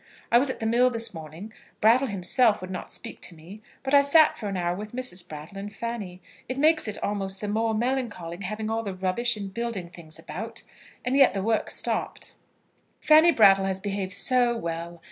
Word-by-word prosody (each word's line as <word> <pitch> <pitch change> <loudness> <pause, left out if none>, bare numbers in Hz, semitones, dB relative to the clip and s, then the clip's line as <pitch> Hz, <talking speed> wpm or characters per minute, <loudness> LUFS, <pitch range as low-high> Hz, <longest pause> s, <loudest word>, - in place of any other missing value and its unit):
I 235 - +7
was 270 +2 +1
at - - -4
the 225 - -3
mill 240 +3 +4
this 230 -2 -2
morning. 165 +7 -9 0.3
Brattle 240 +5 +4
himself 210 +3 +2
would 185 0 -8
not 180 - -6
speak - - -4
to 170 - -5
me, 175 +7 -13 0.2
but 270 +1 -3
I 285 - +8
sat 300 +2 +5
for 215 - -6
an 195 -1 -3
hour 175 0 -1
with 210 +3 -8
Mrs. 190 -9 +1
Brattle 155 +6 -9
and 205 +1 -6
Fanny. 205 -6 -6 0.3
It 255 - -3
makes 310 -1 +3
it 210 - -3
almost 195 -1 -2
the 210 - -4
more 220 +2 0
melancholy 225 -8 -2
having 215 +3 -4
all 225 0 0
the 200 -4 -5
rubbish 200 +6 0
and 200 -2 -7
building 230 -6 -4
things 165 -3 -8
about, - - -6 0.4
and 250 +2 0
yet 270 -8 +5
the 195 - -2
work 220 0 0
stopped. - - -2 0.7
Fanny 315 +2 +6
Brattle 195 -8 +5
has 190 0 -1
behaved 195 -1 -4
so 245 -1 +2
well! 170 -2 -5
210 Hz, 200 wpm, -26 LUFS, 185-240 Hz, 0.7 s, I